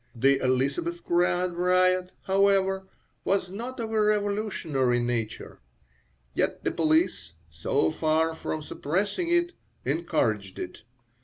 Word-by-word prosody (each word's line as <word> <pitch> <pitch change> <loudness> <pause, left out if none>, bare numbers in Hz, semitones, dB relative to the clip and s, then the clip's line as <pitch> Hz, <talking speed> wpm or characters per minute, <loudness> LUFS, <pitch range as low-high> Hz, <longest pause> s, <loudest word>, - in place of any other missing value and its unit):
The 135 +4 +3
Elisabethgrad 175 - +1
riot, 185 +1 +2
however, 195 0 +2 0.4
was 190 -2 0
not 240 +6 -6
of 225 -1 -3
a 220 -1 +2
revolutionary 200 - +1
nature. 120 -3 -3 0.7
Yet - - -1
the - - 0
police, 160 - +1 0.2
so 80 0 0
far 160 - +1
from 155 -1 -4
suppressing 200 - -2
it, 345 0 +2 0.3
encouraged 115 - 0
it. 90 - -6
180 Hz, 105 wpm, -27 LUFS, 135-200 Hz, 0.7 s, The